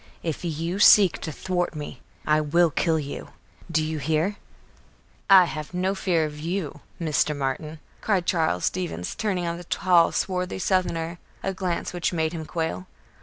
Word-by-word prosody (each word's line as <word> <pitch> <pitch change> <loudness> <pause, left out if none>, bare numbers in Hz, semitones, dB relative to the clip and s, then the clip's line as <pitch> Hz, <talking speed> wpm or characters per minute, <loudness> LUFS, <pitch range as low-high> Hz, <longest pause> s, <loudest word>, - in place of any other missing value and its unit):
If 165 0 -3
you 170 +3 -2
seek 200 -3 +7
to 155 - -4
thwart 175 +1 -2
me, 145 -4 -7 0.2
I 155 0 +3
will 165 +3 +3
kill 160 +2 +1
you. 145 -2 -5 0.4
Do 160 -2 +1
you 155 0 -3
hear?" 160 +7 0 0.9
"I 190 -2 +9
have 155 +1 -6
no 185 +2 +1
fear 180 -5 +1
of 150 -1 -7
you, 165 -2 -3 0.2
Mr. 155 -2 +1
Martin," 145 +3 -3 0.2
cried 195 -5 +1
Charles 160 - +1
Stevens, 170 - -2
turning 190 -5 -1
on 170 0 -2
the 175 - -8
tall, 175 -1 +3
swarthy 180 -1 -2
southerner 175 -3 -1 0.2
a 195 - -1
glance 180 -2 -3
which 175 0 -1
made 160 -1 0
him 160 -2 -5
quail. 170 +2 -3
170 Hz, 165 wpm, -25 LUFS, 155-180 Hz, 0.9 s, I